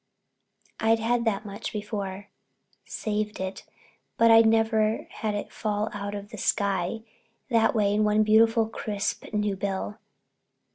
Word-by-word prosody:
I'd 225 +1 +3
had 235 +1 0
that 215 -1 0
much 200 -1 -6
before—saved 210 +1 -6
it—but 190 +4 -2
I'd 225 0 +7
never 220 -1 +2
had 215 -2 -3
it 205 - -5
fall 210 0 -2
out 205 0 -4
of 200 0 -7
the 220 - -8
sky 200 +2 0 0.5
that 225 0 +3
way 205 -2 +2
in 215 +1 +2
one 210 0 +3
beautiful, 225 +1 +4
crisp, 210 -2 -4
new 210 -2 0
bill. 200 +2 -3
210 Hz, 130 wpm, -26 LUFS, 205-225 Hz, 0.5 s, I'd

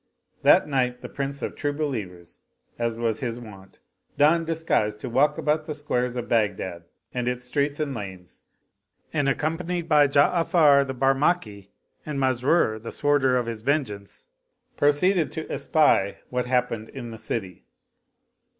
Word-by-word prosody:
That - - +5
night 125 -3 0
the - - -6
Prince 140 0 -4
of - - -3
True 145 0 -2
Believers, 105 - -5 0.4
as 115 -1 -1
was 115 -2 -1
his 120 -2 -3
wont, 100 -5 -13 0.4
donned 160 +3 +4
disguise 160 -10 0
to 105 - -7
walk 145 +5 +3
about 155 +1 0
the 150 - -5
squares 125 -4 -2
of 120 -1 -4
Baghdad 100 -6 -1 0.3
and 125 -1 -2
its 125 0 -2
streets 140 +3 -1
and 150 -3 -2
lanes 95 -6 -9 0.7
and, 145 -3 +1
accompanied 165 +4 -2
by 150 -3 +5
Ja'afar 145 0 +4
the 130 - -4
Barmaki 135 - 0 0.3
and 150 -2 -5
Masrur 130 -3 +2
the 115 - -7
Sworder 145 -3 +2
of 125 - -1
his 115 -2 -5
vengeance, 110 -7 -3 0.5
pro 145 - +4
ceeded 170 +3 +2
to 160 - -5
espy 100 -11 +2
what 125 0 -1
happened 125 -3 -1
in 120 -4 -8
the 110 - -9
city. 95 -5 -5
130 Hz, 150 wpm, -25 LUFS, 115-150 Hz, 0.7 s, That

